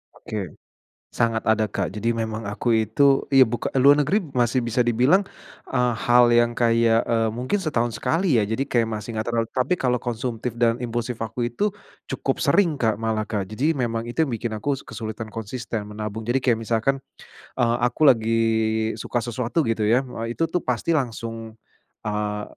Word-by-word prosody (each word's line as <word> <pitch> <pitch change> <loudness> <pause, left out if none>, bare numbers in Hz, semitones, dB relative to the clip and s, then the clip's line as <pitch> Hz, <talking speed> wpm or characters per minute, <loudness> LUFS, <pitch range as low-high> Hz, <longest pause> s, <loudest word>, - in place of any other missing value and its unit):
Oke, 100 -4 -5 0.6
sangat 115 -2 0
ada 110 -1 +2
Kak 100 -1 -3
jadi 110 +2 -1
memang 110 -2 -2
aku 115 +3 0
itu 125 +6 +3
iya, 135 -2 +7
buka 120 +2 -3
luar 145 +3 +6
negeri 170 +9 +1 0.2
masih 120 0 +1
bisa 120 +1 +1
dibilang, 125 - +3 0.5
eee, 125 -1 +1
hal 120 +2 +4
yang 120 0 +4
kayak, 115 -1 +3
eee, 115 -1 +1
mungkin 125 - -2
setahun 120 -8 -1
sekali 155 - +1
ya - - +2
jadi 130 +5 -1
kayak 115 -2 +1
masih 110 +1 -5
enggak 110 +1 -3
terlalu 115 -1 0
tapi 130 +7 +1
kalau 125 -2 0
konsumtif 120 -1 -4
dan 120 0 +2
impulsif 120 0 -3
aku 115 +2 -2
itu, 165 - 0 0.4
cukup - - -2
sering 175 -6 +3
Kak 110 -2 +2
malah 110 -1 -2
Kak 100 -3 -1
jadi 140 +10 -1
memang 115 -1 -2
itu 160 +6 +1
yang 135 - -5
bikin 115 0 -3
aku 140 +7 -1
kesulitan 110 0 -6
konsisten 115 0 -5
menabung. 105 +1 -5
Jadi 125 +3 +1
kayak 120 -4 +2
misalkan, 115 +4 0 0.6
eee, 120 0 +2
aku 125 +5 -3
lagi 115 -2 +2 0.6
suka 120 +2 -2
sesuatu 120 +6 -1
gitu 110 -2 0
ya, 120 +5 +4 0.2
eee, 115 - -4
itu 165 +3 -1
tuh 175 0 -1
pasti 130 +7 0
langsung, 115 -3 -4 0.5
eee, 105 0 -2
115 Hz, 175 wpm, -23 LUFS, 110-125 Hz, 0.6 s, iya